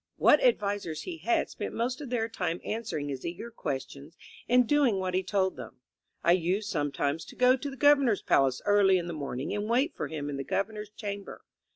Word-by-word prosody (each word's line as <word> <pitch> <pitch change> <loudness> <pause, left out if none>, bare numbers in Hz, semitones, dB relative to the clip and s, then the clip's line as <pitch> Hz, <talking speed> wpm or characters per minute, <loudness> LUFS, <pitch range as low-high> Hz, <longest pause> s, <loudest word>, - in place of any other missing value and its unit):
What - - +5
advisers 200 - 0
he 350 -2 -6
had 345 -1 0
spent - - -5
most 245 +4 -2
of 280 - -7
their 230 -2 0
time 180 -6 -3
answering 215 -10 -3
his 135 -2 -5
eager 175 +8 -6
questions 140 - -6 0.3
and 250 0 +5
doing 280 -7 +3
what 185 -1 -2
he 185 - +2
told 190 0 0
them. - - -10 0.4
I 170 - +4
used 185 +4 +1
sometimes 145 -1 -1
to - - -13
go 250 0 +5
to 275 +2 -5
the 270 - -9
Gov 290 +2 +6
ernor's 235 -8 +1
palace 130 -2 +2
early 205 -2 +5
in 175 - -3
the 175 - -5
morning 140 -3 -4
and 205 +1 -3
wait 260 +8 +2
for - - -3
him 150 -2 -5
in 145 -1 -4
the 135 - -3
Governor's 210 +6 -3
chamber. 205 -1 -7
200 Hz, 210 wpm, -29 LUFS, 165-235 Hz, 0.4 s, Gov